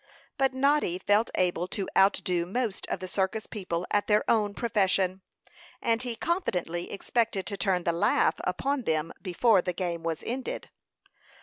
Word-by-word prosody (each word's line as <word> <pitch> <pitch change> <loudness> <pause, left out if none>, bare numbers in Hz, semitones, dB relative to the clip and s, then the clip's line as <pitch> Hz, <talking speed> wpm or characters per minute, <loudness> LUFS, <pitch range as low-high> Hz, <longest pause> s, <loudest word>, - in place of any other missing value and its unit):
But 270 -1 +3
Noddy 275 -8 +2
felt 205 +4 +2
able 180 -1 +1
to 190 0 -3
outdo 185 -3 +3
most 225 +1 -2
of - - -2
the 185 - -4
circus 190 +3 -1
people 180 -4 -4
at 205 - +1
their 210 0 +4
own 210 -3 +2
profession, 190 -4 +1 0.6
and 230 0 +1
he 245 -2 -3
confidently 180 - -2
expected 220 -1 -1
to 205 - -3
turn 190 -3 0
the 170 - +2
laugh 170 - +3
upon 275 -3 -1
them 160 0 0
before 190 +2 +3
the 180 - -2
game 175 -2 -3
was 165 -1 -3
ended. 255 +2 -4
195 Hz, 160 wpm, -28 LUFS, 180-230 Hz, 0.6 s, their